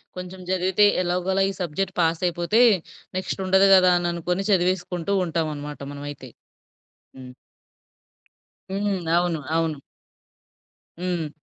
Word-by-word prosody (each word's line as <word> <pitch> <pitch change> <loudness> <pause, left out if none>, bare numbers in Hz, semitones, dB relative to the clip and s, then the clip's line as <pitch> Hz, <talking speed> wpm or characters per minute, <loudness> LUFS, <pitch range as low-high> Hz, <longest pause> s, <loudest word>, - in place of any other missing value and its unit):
కొంచెం 180 +1 -8
చదివితే 190 +2 +3 0.2
ఎలాగోలా 180 +2 0
ఈ - - -4
సబ్జెక్ట్ 185 +3 -2
పాస్ 165 +1 +1
అయిపోతే, 175 +6 +1 0.6
నెక్స్ట్ 185 - -3
ఉండదు 190 +1 +5
గదా 185 -1 +6
అని 175 0 -1
అనుకోని 180 +3 -2
చదివేసుకుంటూ 180 0 0
ఉంటామనమాట 150 -4 -3
మనమైతే. 145 -2 -8 0.9
హ్మ్. 130 -1 -10 1.4
హ్మ్. 195 0 -1 0.2
అవును. 175 -3 0 0.2
అవును. 160 -4 -1 1.2
హ్మ్. 175 -4 -2
180 Hz, 105 wpm, -24 LUFS, 165-190 Hz, 1.4 s, గదా